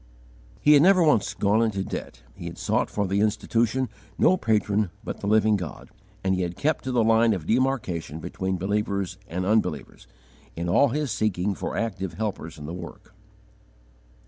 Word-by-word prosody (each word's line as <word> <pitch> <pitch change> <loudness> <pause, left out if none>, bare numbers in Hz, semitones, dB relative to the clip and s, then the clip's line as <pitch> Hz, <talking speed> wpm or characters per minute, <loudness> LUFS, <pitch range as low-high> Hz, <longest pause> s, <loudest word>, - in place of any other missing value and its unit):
He 150 - +6
had 145 - +7
never 185 +1 +6
once 150 -10 +2
gone 105 +3 +2
into 105 -4 0
debt; - - -7
he - - -10
had - - -6
sought - - 0
for 105 - -1
the 100 +1 0
Institution 115 +4 +1 0.3
no 185 - +5
patron 105 - +1
but - - -5
the - - -4
Living 110 0 +4
God; 90 -4 -8 0.3
and 95 0 +2
he 95 - 0
had 90 -1 -3
kept 155 +2 0
to 130 - -1
the 120 -2 +3
line 115 0 +4
of 90 -6 -4
demarcation 110 - 0
between 95 +3 -3
believers 100 -1 -2
and 90 +1 -3
unbelievers, 95 -8 -1 0.5
in 85 +1 -3
all 95 +11 +4
his 145 0 -2
seeking 100 -2 0
for - - -4
active 95 -5 -3
helpers 100 -7 -4
in 75 - -8
the 80 - -6
work. 85 -1 -10
105 Hz, 175 wpm, -25 LUFS, 90-115 Hz, 0.5 s, had